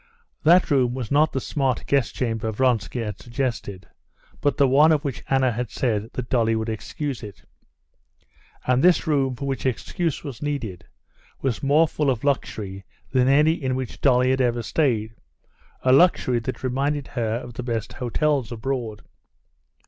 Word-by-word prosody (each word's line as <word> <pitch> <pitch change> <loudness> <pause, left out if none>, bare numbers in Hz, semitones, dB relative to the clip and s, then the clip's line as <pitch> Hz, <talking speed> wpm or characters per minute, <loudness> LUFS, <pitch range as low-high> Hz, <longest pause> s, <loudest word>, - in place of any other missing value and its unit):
That 170 +2 +5
room 125 -3 +2
was 125 -5 -5
not 150 +2 +4
the 135 - -1
smart 135 -1 -1
guest 140 -3 +1
chamber 115 -3 -1
Vronsky 120 0 0
had 105 -3 -5
suggested, 115 -6 -4 0.5
but 145 -2 +1
the 140 - +5
one 145 +5 +5
of 150 -2 +2
which 135 -1 -4
Anna 135 -2 +3
had 120 0 -3
said 110 -1 -1
that 125 -1 -4
Dolly 115 -3 +2
would 110 0 -2
excuse 135 +4 -4
it. 105 -5 -10 1.2
And 125 +1 +2
this 180 0 +4
room, 135 -5 +1
for 140 - -6
which 135 -1 -3
excuse 160 - -2
was 140 -6 -7
needed, 120 -12 -4 0.6
was 130 -5 -1
more 150 +4 +4
full 150 -2 -1
of 125 -4 -1
luxury 105 -8 -2 0.3
than 130 -1 +3
any 150 +4 +5
in 130 -5 -2
which 130 -2 -5
Dolly 130 -1 +4
had 130 0 +1
ever 120 -1 0
stayed, 115 -6 0 0.7
a 130 - +3
luxury 135 -6 +4
that 130 +3 -6
reminded 140 +3 -1
her 115 -4 -1
of 120 0 -6
the 125 - -5
best 115 -3 -3
hotels 130 0 0
abroad. 120 -2 -4
130 Hz, 165 wpm, -23 LUFS, 115-140 Hz, 1.2 s, That